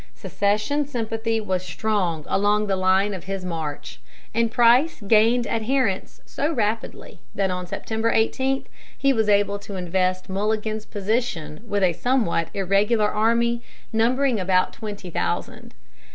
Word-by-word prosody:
Secession 210 - 0
sympathy 225 -3 -2
was 185 -4 -1
strong 180 -4 -1
along 210 +2 +2
the 195 -2 0
line 190 +2 +2
of 185 - -7
his 195 -1 -4
march, 160 -4 -5 0.3
and 230 0 +1
Price 245 +8 +4
gained 230 +3 +4
adherents 225 -3 -1
so 290 +3 -2
rapidly 225 -5 -3 0.2
that 195 -2 +1
on 180 0 -4
September 220 +5 -2
18 265 +4 +1 0.3
he 275 0 +3
was 220 -3 +1
able 200 0 +2
to 200 0 -8
invest 185 0 -1
Mulligan's 215 +2 -2
position 205 -6 -2
with 205 -2 0
a 180 -2 +3
somewhat 220 -7 0
irregular 205 +3 +2
army 235 +2 +2 0.3
numbering 245 +2 +2
about 185 0 +2
twenty 205 -4 -7
thousand. 85 - -3
210 Hz, 135 wpm, -23 LUFS, 190-230 Hz, 0.3 s, Price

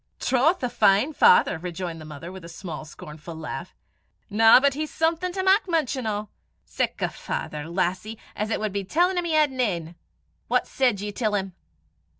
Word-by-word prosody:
"Troth, 270 +6 +2
a 250 - +1
fine 210 +7 +3
father!" 180 - +5
rejoined 175 -1 -5
the - - -9
mother, 155 +3 -8
with 190 -1 -10
a 170 - -9
small 165 -2 -7
scornful 155 +2 -10
laugh. 160 +1 -7 0.6
"Na, 225 +3 +7
but 280 +1 +2
he's 305 +2 -4
something 330 +3 0
to 380 +1 -3
mak 385 +1 +3
mention 275 -7 0
o'! 210 -1 -3 0.4
Sic - - -2
a - - +1
father, 150 +1 -5
lassie, 185 +5 -2 0.2
as 210 +1 -2
it - - -1
wad 215 -2 -2
be 200 -1 -2
tellin' 355 - +2
him 350 - -3
he 335 - -1
had 305 -2 +4
nane! 185 -11 -2 0.5
What - - +2
said 245 -7 +1
ye 205 0 -4
till 215 0 -1
'im?" 190 -2 -2
210 Hz, 185 wpm, -25 LUFS, 175-280 Hz, 0.6 s, Na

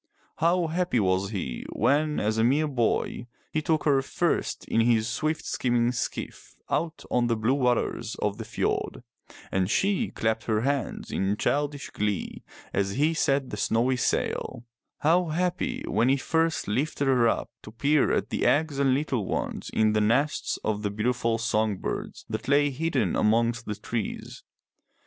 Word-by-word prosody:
How 170 +2 +2
happy 165 -5 0
was 95 -1 +1
he 90 - -4
when, 150 +1 +2
as 110 +1 0
a - - +4
mere 145 +6 +3
boy, 120 -2 -1 0.2
he 155 - 0
took 155 -1 +1
her 140 -3 +3
first 135 - -1
in 115 - +2
his 115 -1 +3
swift 155 +7 -2
skimming 120 -1 +1
skiff 125 - -5 0.2
out 165 0 -1
on 120 -1 +2
the 115 - +1
blue 110 +4 +1
waters 120 -3 0
of 105 -1 -2
the - - -3
fjord, - - -2 0.5
and 95 -1 +1
she 200 - +1
clapped 110 0 -1
her 110 -1 +1
hands 140 +1 -2
in 95 +2 0
childish 145 +2 -1
glee 105 -2 -2 0.3
as 100 0 0
he 150 +6 +2
set 135 -4 +1
the 105 - -4
snowy 120 +5 +1
sail; 120 -1 -1 0.4
how 170 +4 +4
happy 175 +3 -1
when 115 +5 +2
he 135 - +4
first 160 +4 0
lifted 140 +7 -1
her 125 -3 +4
up - - -1
to - - -10
peer 140 +6 +2
at - - -1
the - - -1
eggs 145 -1 +2
and 135 -2 +3
little 130 -8 -1
ones - - -3
in 110 -1 +2
the 105 - +2
nests 125 +8 +1
of 105 -1 -1
the 105 - -1
beautiful 115 +2 0
song 110 -3 0
birds - - -5
that - - -5
lay 145 +1 +3
hidden 135 - 0
amongst 115 +2 +2
the 105 - -2
trees. 110 +1 -5
125 Hz, 170 wpm, -27 LUFS, 110-145 Hz, 0.5 s, a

